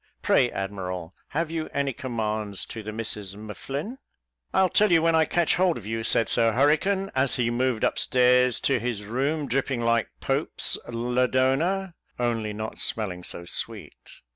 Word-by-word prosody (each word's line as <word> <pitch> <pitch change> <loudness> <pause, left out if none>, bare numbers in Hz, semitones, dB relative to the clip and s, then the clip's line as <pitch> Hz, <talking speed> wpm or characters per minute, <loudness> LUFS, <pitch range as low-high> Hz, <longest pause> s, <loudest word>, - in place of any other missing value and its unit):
Pray, - - +4
admiral, 90 -3 -5
have 160 +2 -2
you 160 -1 -3
any 140 -1 0
commands 110 -5 -3
to 110 - -7
the 110 0 -6
Misses 105 -3 -5
M'Flinn?" 140 - -6 0.5
"I'll 190 0 +4
tell 210 +3 +3
you 165 - +6
when 165 +1 +2
I 160 -1 +4
catch 170 +1 +1
hold 180 -2 +2
of - - -10
you," 115 +1 -3
said 115 - +3
Sir 115 -1 +3
Hurricane, 160 - +2
as 130 0 +2
he 120 -1 0
moved 125 -1 +1
up - - 0
stairs 125 -2 +4
to 135 -3 +2
his 110 -3 -3
room, 140 +7 -1
dripping 130 0 -1
like 115 -1 +1
Pope's - - +1
Lodona, 130 +10 +1 0.2
only 115 -3 -1
not 110 +1 -6
smelling 95 -5 -1
so 85 - -6
sweet. 85 - -4
125 Hz, 165 wpm, -26 LUFS, 110-150 Hz, 0.5 s, you